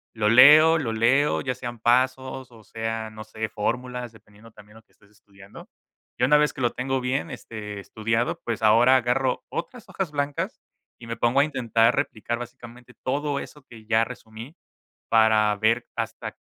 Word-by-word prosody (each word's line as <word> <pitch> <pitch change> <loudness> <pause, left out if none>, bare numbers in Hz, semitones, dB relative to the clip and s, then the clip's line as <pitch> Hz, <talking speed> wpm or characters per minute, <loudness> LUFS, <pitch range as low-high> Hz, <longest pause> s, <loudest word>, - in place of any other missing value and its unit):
lo 105 -1 +1
leo, 150 +7 +8
lo 125 -8 -2
leo, 130 +6 +2
ya 130 -1 -2
sean 120 -2 -7
pasos 130 +2 0
o 115 -2 -16
sean, 110 0 -5
no 110 - -8
sé, 110 +1 -5
fórmulas, 125 +3 -3
dependiendo 110 +1 -18
también 105 0 -18
lo 110 - -17
que - - -38
estés 100 - -26
estudiando. 100 -1 -16 0.5
Y - - 0
una 150 +2 +5
vez 150 0 +2
que 135 - -8
lo 120 -2 +1
tengo 130 +1 -2
bien, 125 +2 -2
este, 105 -2 -8
estudiado, 115 +4 -2
pues, 115 -1 -3
ahora 115 +4 +5
agarro 125 +1 0
otras 230 +7 -7
hojas 190 -5 -4
blancas 145 -1 -3 0.4
y 115 - -12
me 115 - -5
pongo 120 +3 +2
a - - +6
intentar 115 -5 +1
replicar 120 +2 -2
básicamente 120 0 -11
todo 140 +2 -1
eso 150 -2 -11
que 110 -4 -15
ya 115 0 +3
resumí 115 +9 -11 0.6
para 110 -2 +4
ver 115 +3 +1
hasta - - -5
120 Hz, 175 wpm, -24 LUFS, 110-130 Hz, 0.6 s, leo